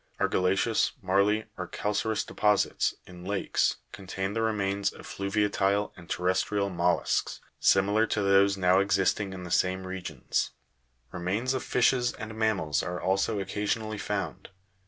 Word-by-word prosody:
Argilla'ceous, 95 +5 +2
marly, 100 +2 +2
or - - -3
calca'reous 105 +1 -1
deposits, 105 -2 +1
in 90 -1 -12
lakes, 100 +1 0 0.2
contain 95 0 -4
the 115 - -1
remains 100 -3 0
of - - -13
fluviatile 100 0 0
and 85 -2 -14
terrestrial 95 +2 0
mollusks, 90 0 0 0.2
similar 100 +3 +3
to 105 - 0
those 100 0 +4
now 90 0 +4
existing 100 0 +1
in 95 -1 -7
the 90 - -8
same 95 +1 +1
regions. 90 -7 -3 0.6
Remains 100 +9 -1
of 130 - -1
fishes 125 0 +2
and 110 0 -7
mammals 105 -10 0
are 90 0 -4
also 100 +3 0
occasionally 105 +2 -2
found. 100 -2 -4
100 Hz, 135 wpm, -28 LUFS, 95-105 Hz, 0.6 s, those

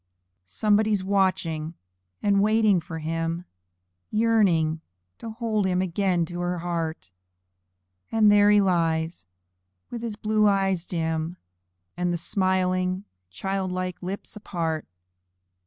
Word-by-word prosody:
Somebody's 210 - +2
watching 185 -5 0 0.5
and 200 -1 +3
waiting 215 -2 +4
for 165 0 -7
him, 165 +2 -3 0.6
Yearning 195 -8 +2 0.4
to 230 - -6
hold 220 -3 -1
him 180 -1 +1
again 185 -1 +1
to 175 +2 -7
her 175 0 -1
heart; 165 - -3 1.0
And 215 -2 +5
there 205 0 +6
he 210 0 +6
lies 165 - 0 0.6
with 235 - -5
his 230 -3 -4
blue 215 0 +2
eyes 195 -3 +1
dim, 160 0 -2 0.6
And 180 +1 0
the 175 - 0
smiling 185 +1 0 0.3
child 195 - -3
like 180 -1 -3
lips 190 +4 -6
apart. 165 -6 -3
185 Hz, 115 wpm, -25 LUFS, 165-205 Hz, 1.0 s, there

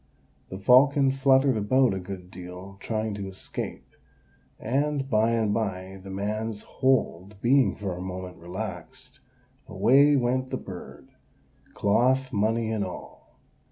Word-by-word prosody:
The 95 - -6
falcon 135 +6 +5
fluttered 135 -1 +3
about 120 +3 +3
a 95 - -3
good 90 -1 -8
deal, 90 +2 -10
trying 110 0 -2
to 100 -1 -5
escape; 95 0 -7 0.7
and, 140 +3 -1
by 110 -2 +2
and 110 -3 +1
by, 95 -3 -3
the 95 - -9
man's 105 +2 -3
hold 105 -7 0
being 130 +4 +3
for 95 -4 -4
a 90 - -7
moment 90 0 -6
relaxed, 90 +6 -8 0.5
away 140 +4 +4
went 130 0 0
the - - -2
bird, - - -10 0.7
cloth, 130 +6 +2
money, 110 +2 +1
and 110 -2 -1
all. 90 - -10
110 Hz, 130 wpm, -26 LUFS, 95-130 Hz, 0.7 s, falcon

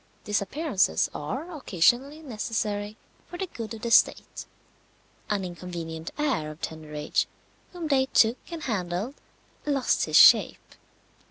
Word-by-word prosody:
Disappearances 205 - 0
are 285 - -5
occasionally 270 - +1
necessary 215 -4 -3 0.3
for 350 - -8
the 380 - -2
good 230 -9 -7
of 220 - -12
the 235 - -2
state. - - +2 0.8
An 200 -3 0
inconvenient 170 -2 -6
heir 275 - 0
of 155 +1 -10
tender 155 -1 -7
age 150 0 0 0.4
whom 345 -3 -5
they 265 -3 +2
took 230 -1 +3
and 335 -3 -6
handled 195 0 -2 0.5
lost 280 -3 +1
his - - +3
shape. - - +6
220 Hz, 125 wpm, -26 LUFS, 175-280 Hz, 0.8 s, shape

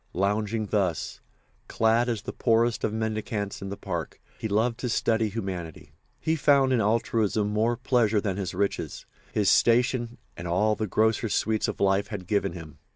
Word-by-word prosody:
Lounging 105 +3 0
thus, 95 -6 -1 0.5
clad 115 +2 +2
as 110 -4 -2
the - - -6
poorest 115 0 +2
of - - +1
mendicants 110 -2 -3
in 95 - -5
the 100 - -5
parks, - - -5 0.2
he - - -2
loved 115 +3 0
to 125 - -2
study 110 -1 +1
humanity. 90 -8 -6 0.3
He 160 0 0
found 140 -3 +4
in 120 - +3
altruism 110 -1 +1
more 110 +3 +1
pleasure 120 -4 +2
than 100 -2 -2
his 95 -3 -4
riches, 100 +1 -2 0.3
his 105 -2 0
station 120 0 +3 0.2
and 85 - -6
all 105 +6 +2
the 110 - -2
grosser 110 +2 +1
sweets 110 +1 0
of - - -4
life 100 +1 +2
had 100 -4 -6
given 100 -2 0
him. 80 -4 -10
110 Hz, 170 wpm, -26 LUFS, 100-115 Hz, 0.5 s, found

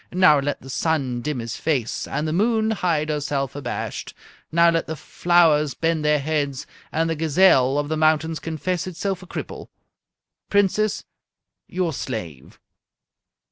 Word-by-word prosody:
Now 180 -5 +5
let 145 +1 -3
the 135 - -10
sun 135 -6 -1
dim 150 +1 -3
his 115 -2 -5
face 135 -8 -1
and 150 +3 -2
the 155 - -1
moon 220 +3 +2
hide 165 -7 0
herself 145 -3 -2
abashed. 145 - -5 0.4
Now 170 +1 +5
let 165 -1 -1
the 160 - -4
flowers 155 -2 +2
bend 165 -1 0
their 150 0 +3
heads 145 -2 -2 0.3
and 165 +1 0
the 165 - -1
gazelle 150 -4 +4
of 145 0 0
the 155 - -1
mountains 155 +1 +2
confess 170 +3 -3
itself 190 +1 -3
a 185 - -12
cripple. - - -7 0.8
Princess, 205 +1 +1 0.6
your 180 -3 -1
slave!" 90 - -6
155 Hz, 145 wpm, -23 LUFS, 145-175 Hz, 0.8 s, Now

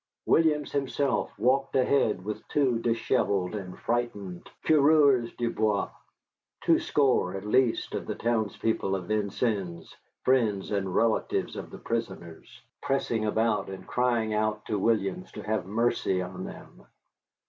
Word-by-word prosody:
Williams 150 -3 +3
himself 140 0 0
walked 135 +2 +1
ahead 130 -7 +2
with 105 +1 -5
two 130 -5 +1
dishevelled 105 -5 0
and 95 -3 -6
frightened 105 -7 -3 0.2
coureurs 145 -5 +5
du 120 -1 0
bois, 105 -2 0 0.7
twoscore 130 -10 +2
at 95 +1 -6
least 120 +2 +2
of - - -4
the - - -3
townspeople 110 -3 0
of 95 -2 -4
Vincennes, 100 -4 -2 0.3
friends 110 -7 +2
and 95 -3 -1
relatives 115 -1 +1
of - - -6
the - - -9
prisoners, 95 -8 -5 0.2
pressing 135 -5 0
about 110 0 +1
and 95 -1 -8
crying 120 -3 0
out 105 0 -1
to 105 -2 -1
Williams 115 - 0
to - - -7
have 105 -4 -2
mercy 105 -3 +1
on 90 0 -5
them. - - -11
110 Hz, 130 wpm, -28 LUFS, 100-125 Hz, 0.7 s, coureurs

